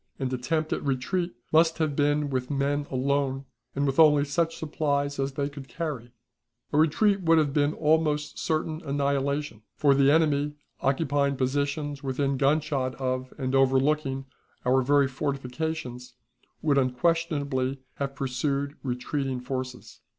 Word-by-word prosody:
An 130 -1 -2
attempt 155 +5 -1
at - - -3
retreat 140 +5 -1 0.2
must 160 +1 +4
have 155 -3 0
been 145 0 +1
with 130 -1 -2
men 145 0 0
alone, 135 0 0 0.3
and 140 +1 +1
with 135 +2 0
only 150 -2 +6
such 165 +3 0
supplies 145 -2 -1
as 135 0 -1
they 140 +1 -1
could 140 -2 -9
carry. 140 -8 -5 0.6
A - - +2
retreat 195 +6 +3
would 165 -2 +4
have 150 -3 +2
been 145 0 +2
almost 150 -1 +1
certain 155 0 -1
annihilation, 140 -3 -1
for 145 -2 +4
the 135 0 +4
enemy, 150 -1 +2 0.2
occupying 140 0 +1
positions 140 +2 -1
within 135 +1 -1
gunshot 140 -2 +1
of 130 0 -2
and 130 -2 -2
overlooking 135 +1 +2 0.4
our 130 +1 +4
very 140 +1 +3
fortifications, 130 -2 -4 0.5
would 145 -3 +3
unquestionably 140 -1 0 0.2
have 140 -1 -3
pursued 140 +2 -2
retreating 130 +1 -2
forces. 130 0 -6
140 Hz, 135 wpm, -27 LUFS, 135-150 Hz, 0.6 s, only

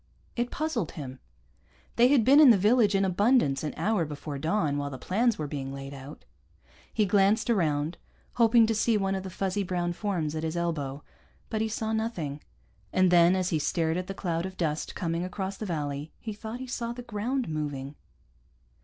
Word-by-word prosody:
It 240 0 -1
puzzled 280 - -2
him. 130 -3 -7 0.8
They 240 +1 +6
had 260 -5 +4
been 280 +3 +7
in 300 -4 +9
the 225 - +7
village 210 +1 +4
in 195 0 +3
abundance 190 - +2
an 150 - -3
hour 210 -4 +1
before 145 -1 -6
dawn, 155 -3 0
while 145 0 -3
the 135 - -7
plans 220 - +1
were 155 - -3
being 140 -2 -5
laid 135 0 -7
out. 140 +2 -10 0.7
He 215 - +2
glanced 205 +4 +3
around, 155 -5 0 0.3
hoping 230 -1 +5
to 225 - +1
see 220 +1 +2
one 195 -1 0
of 190 - -2
the 190 - -7
fuzzy 190 +2 -2
brown 175 -2 -1
forms 175 -6 -2
at 155 - -3
his 160 +1 -3
elbow, 145 -5 -2 0.5
but 220 - -1
he 220 - 0
saw 220 0 -2
nothing. 175 -11 -3 0.5
And 185 -1 +3
then, 175 +1 +6
as 185 -1 0
he 160 - 0
stared 160 +1 0
at 180 +1 -3
the 195 - -5
cloud 170 -1 -2
of 190 - -11
dust 155 -3 -2
coming 170 0 -2
across 190 +2 -4
the 215 - -5
valley, 145 -3 -3
he 220 - -5
thought 220 +3 -7
he 260 - -5
saw 235 -2 -3
the 245 +1 -8
ground 240 +3 -2
moving. 145 -3 -4
185 Hz, 200 wpm, -28 LUFS, 155-220 Hz, 0.8 s, in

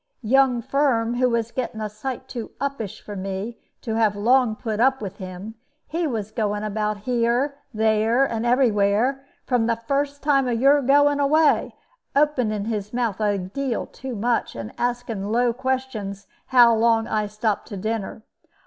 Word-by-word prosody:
Young 250 +1 +3
Firm, 255 -4 +1
who 250 0 +3
was 230 -1 -1
getting 245 -3 -4
a 215 - -2
sight 255 +5 -6
too 235 -4 -6
uppish 275 -8 -4
for 205 - -9
me 195 +4 -5 0.2
to 225 - -3
have 220 -2 +2
long 235 +2 +3
put 220 -2 -4
up 265 +2 +3
with 200 -3 -6
him, 185 +3 -7 0.3
he 335 +1 -2
was 215 -6 -3
going 210 -2 -1
about 210 0 -1
here, 245 +4 0
there, 220 +3 +2
and 230 -4 -3
every 245 0 +3
where, 210 +7 +1 0.2
from 245 -3 +1
the 230 - +2
very 230 0 -20
first 285 0 -1
time 275 -3 +3
of 235 -2 0
your 280 +3 +5
going 285 +2 +4
away, 295 +2 +3 0.4
opening 250 -8 +1
his 210 -2 -3
mouth 235 -5 -1
a 205 -1 +2
deal 230 +7 -3
too 260 -2 -7
much, 230 +3 -1
and 115 -2 -7
asking 240 -4 -2
low 240 +1 +2
questions 250 -6 -3 0.2
how 240 -2 +6
long 225 0 +3
I 215 -2 -1
stopped 215 0 -2
to 205 - -7
dinner. 215 +1 -4
230 Hz, 170 wpm, -23 LUFS, 215-260 Hz, 0.4 s, how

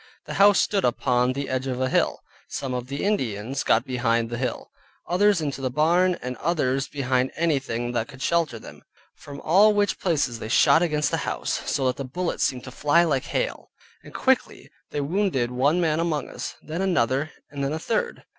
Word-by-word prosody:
The - - -6
house 205 0 +7
stood 200 -2 +1
upon 125 +1 +1
the 140 +1 -4
edge 130 +1 -2
of 130 -1 -3
a 130 - +1
hill; - - +1 0.3
some 135 -2 -4
of 125 0 -4
the 140 +2 -4
Indians 130 - -1
got 115 +3 +2
behind 115 -2 0
the 120 - -3
hill, 125 -2 -4 0.4
others 195 0 +3
into 140 -3 -3
the 130 - -1
barn, 170 +6 +2
and 125 0 -4
others 135 -5 0
behind 130 -2 0
anything 135 -7 -1
that 115 -1 -1
could 135 0 -9
shelter 165 -8 +1
them; - - -12 0.3
from 140 -1 -11
all 205 +6 +5
which 205 0 +1
places 140 -10 0
they 110 - -6
shot 160 +6 +5
against 150 -4 +1
the - - +1
house, - - -2
so 135 - 0
that 125 - 0
the 140 - -4
bullets 170 +7 -2
seemed 125 -2 -1
to 125 - -9
fly 150 +6 +3
like 140 -6 0
hail; - - -3 0.3
and - - -14
quickly - - 0 0.2
they 145 - -2
wounded 145 -6 0
one 140 +7 +2
man 160 -2 +1
among 165 -3 -1
us, - - -6
then 160 +4 -4
another, 145 -6 +1 0.2
and 140 -1 -4
then 140 - -1
a 155 - -2
third. 220 +7 -2
140 Hz, 200 wpm, -24 LUFS, 125-170 Hz, 0.4 s, house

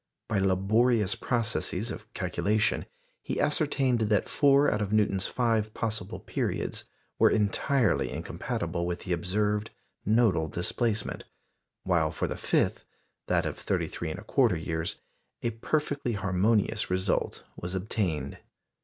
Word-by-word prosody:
By 110 - +1
laborious 100 +3 +3
processes 115 -3 -1
of 110 +2 -9
calculation, 105 +4 +1 0.3
he - - -3
ascertained 140 -5 +2
that 105 -3 +2
four 140 0 +4
out 105 - 0
of 105 -1 -2
Newton's 100 -3 +2
five 110 -3 0
possible 110 -4 -3
periods - - -3 0.3
were - - +7
entirely 115 +4 +2
incompatible 85 0 -3
with 90 0 -3
the 90 - -2
observed 105 +5 0 0.3
nodal 105 -7 +3
displacement, 105 +6 -1 0.6
while - - +2
for - - -2
the - - -3
fifth - - +1 0.4
that - - +2
of - - -4
33 80 -2 -2
1/4 105 - +1
years 80 -1 -1 0.5
a 115 - +1
perfectly 140 +2 -1
harmonious 105 +2 +1
result 95 +1 0
was 90 +2 -5
obtained. 90 -8 -2
105 Hz, 120 wpm, -28 LUFS, 95-115 Hz, 0.6 s, were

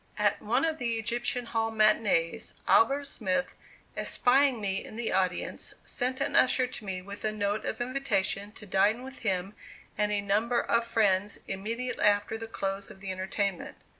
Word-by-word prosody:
At - - +2
one - - +1
of 320 -1 -1
the 235 -2 0
Egyptian 240 +3 -1
Hall 225 -1 0
matinees, 215 -3 +2
Albert 275 +5 +4
Smith, 220 -2 -2 0.4
espying 265 0 +3
me 195 -2 -2
in - - -10
the 235 0 -2
audience, 185 -1 -1
sent 255 +1 -1
an - - -1
usher 255 0 +5
to 250 - -8
me 185 -2 -4
with 200 +1 -9
a 215 - +1
note 205 0 -1
of - - -3
invitation 210 -6 -1
to 210 - -12
dine 205 +5 +2
with 265 0 -9
him 195 -2 -1 0.5
and 210 0 +2
a 205 - +1
number 215 +4 +1
of 235 0 +1
friends 205 -3 +2
immediately 230 +6 -3
after 205 +1 +3
the 225 0 -6
close 195 -2 -3
of 195 - -12
the 190 -1 -5
entertainment. 190 0 -2
215 Hz, 170 wpm, -29 LUFS, 195-240 Hz, 0.5 s, usher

